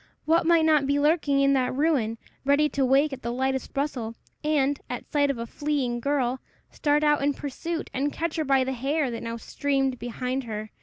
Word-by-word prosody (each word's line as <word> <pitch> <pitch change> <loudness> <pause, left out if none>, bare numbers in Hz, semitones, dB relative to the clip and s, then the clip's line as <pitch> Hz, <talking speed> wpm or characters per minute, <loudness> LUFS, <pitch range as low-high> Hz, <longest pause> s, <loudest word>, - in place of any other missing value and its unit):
What 325 +1 +3
might 335 -2 +5
not 305 -3 +4
be 285 +1 +2
lurking 290 -2 +2
in 275 0 +4
that 255 -1 +1
ruin, 265 -7 +1 0.3
ready 285 +2 +4
to 275 - 0
wake 275 +3 +3
at 260 - -7
the 235 - -3
lightest 265 +1 -1
rustle, 250 -6 -2 0.3
and, 285 -2 +1
at 245 - -6
sight 285 -1 +2
of 275 - -1
a 230 - -4
fleeing 265 -2 -2
girl, 260 -1 0 0.3
start 295 0 +1
out 295 -1 +3
in 285 0 +1
pursuit, 325 +4 -5
and 280 +3 0
catch 330 +1 -3
her 315 - +1
by 270 -2 +3
the 265 +1 -2
hair 270 +2 -1
that 230 - -5
now 230 0 -4
streamed 270 0 -1
behind 250 +2 -3
her! 215 -1 -5
275 Hz, 205 wpm, -26 LUFS, 255-295 Hz, 0.3 s, might